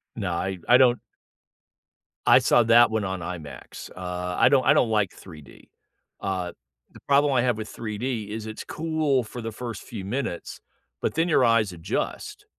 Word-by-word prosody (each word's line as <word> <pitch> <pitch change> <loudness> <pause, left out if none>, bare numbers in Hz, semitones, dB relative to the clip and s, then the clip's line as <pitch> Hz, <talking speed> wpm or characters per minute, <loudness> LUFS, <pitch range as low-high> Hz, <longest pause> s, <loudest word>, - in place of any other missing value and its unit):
No. 100 -6 -3
I 95 +2 -3
I 125 - +7
don't 125 -2 +4 1.3
I - - +7
saw 120 - +4
that 115 +1 +6
one 110 -1 0
on 95 -1 -3
IMAX. 80 -7 -8
Uh, 90 0 -4
I - - +5
don't 135 -3 +3
I - - +6
don't 120 - +3
like 105 -4 +1
3D. 75 -6 -14 0.5
Uh, 95 -2 -3 0.4
the - - -15
problem 140 0 +4
I 125 - +3
have 120 -2 +1
with 110 -1 -6
3D 110 -1 -4
is 110 0 -5
it's 110 - -7
cool 155 -5 0
for 120 +2 -8
the 115 0 -5
first 115 -1 -7
few 105 -5 -8
minutes, 115 -4 -4 0.4
but - - -1
then 165 +2 +1
your 135 -5 +4
eyes 115 -4 +3
adjust. 85 -2 -4
110 Hz, 175 wpm, -25 LUFS, 95-125 Hz, 1.3 s, I